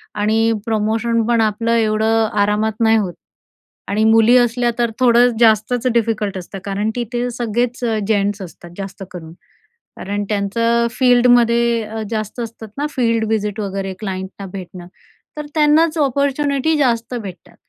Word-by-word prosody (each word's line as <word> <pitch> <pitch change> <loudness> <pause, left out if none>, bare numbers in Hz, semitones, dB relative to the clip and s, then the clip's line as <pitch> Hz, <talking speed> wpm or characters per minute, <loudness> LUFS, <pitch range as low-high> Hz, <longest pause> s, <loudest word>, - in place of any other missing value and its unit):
आणि 220 +2 +1
प्रमोशन 225 +1 0
पण 235 -1 +2
आपलं 220 +1 0
एवढं 220 0 +2
आरामात 210 +2 +1
नाही 225 0 +4
होत 190 -5 -2 0.7
आणि 210 +2 0
मुली 225 +2 +5
असल्या 240 0 +2
तर 235 -1 +1
थोडं 245 -1 +5
जास्तच 230 +2 +3
डिफिकल्ट 215 -4 0
असतं 185 +2 -8
कारण 200 +2 -1
तिथे 240 0 -2
सगळेच 240 +1 -2 0.3
जेंट्स 205 -1 0
असतात 175 -1 -11
जास्त 195 -1 -7
करून, 165 -3 -9 0.7
कारण 205 +1 -3
त्यांचं 230 +3 +1
फील्डमध्ये 235 -1 +3
अ, 220 +1 -6
जास्त 215 +1 -4
असतात 225 -1 -7
ना 290 - -1
फील्ड 230 -5 0
विजिट 210 -1 -1
वगैरे 195 -1 -3
क्लाइंटना 190 -1 -6
भेटणं. 180 -2 -8 0.5
तर 300 - -4
त्यांनाच 310 +2 +3
ऑपॉर्च्युनिटी 280 +1 +1
जास्त 240 -4 0
भेटतात, 195 -7 -9
225 Hz, 135 wpm, -18 LUFS, 205-240 Hz, 0.7 s, मुली